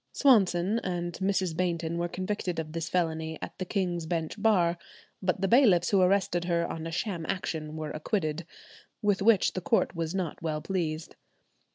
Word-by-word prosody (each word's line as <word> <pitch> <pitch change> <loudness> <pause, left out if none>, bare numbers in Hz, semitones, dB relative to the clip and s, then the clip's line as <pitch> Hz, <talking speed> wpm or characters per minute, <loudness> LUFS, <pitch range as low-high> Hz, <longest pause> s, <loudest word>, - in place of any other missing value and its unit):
Swanson 205 -5 +4
and 175 -4 -3
Mrs. 190 -3 0
Bainton 170 -1 -1
were 175 - 0
convicted 185 0 -3
of 155 -1 -4
this 165 0 -4
felony 160 -2 -1
at - - -7
the 185 - -2
King's 175 -4 -2
Bench 165 -2 -2
Bar; 175 -6 +3 0.4
but 185 0 0
the 195 - +2
bailiffs 195 -7 +5
who 195 -2 +4
arrested 180 -2 +2
her 170 -1 +1
on 165 -1 -5
a - - -5
sham 180 0 -2
action 155 -4 -3
were 155 -1 -4
acquitted, 155 -1 -2 0.6
with 205 -2 +2
which 210 -1 +4
the 185 - -3
court 225 +1 +1
was 165 +1 -2
not 180 -4 -3
well 155 -2 -2
pleased. 160 -3 -3
175 Hz, 175 wpm, -29 LUFS, 165-190 Hz, 0.6 s, bailiffs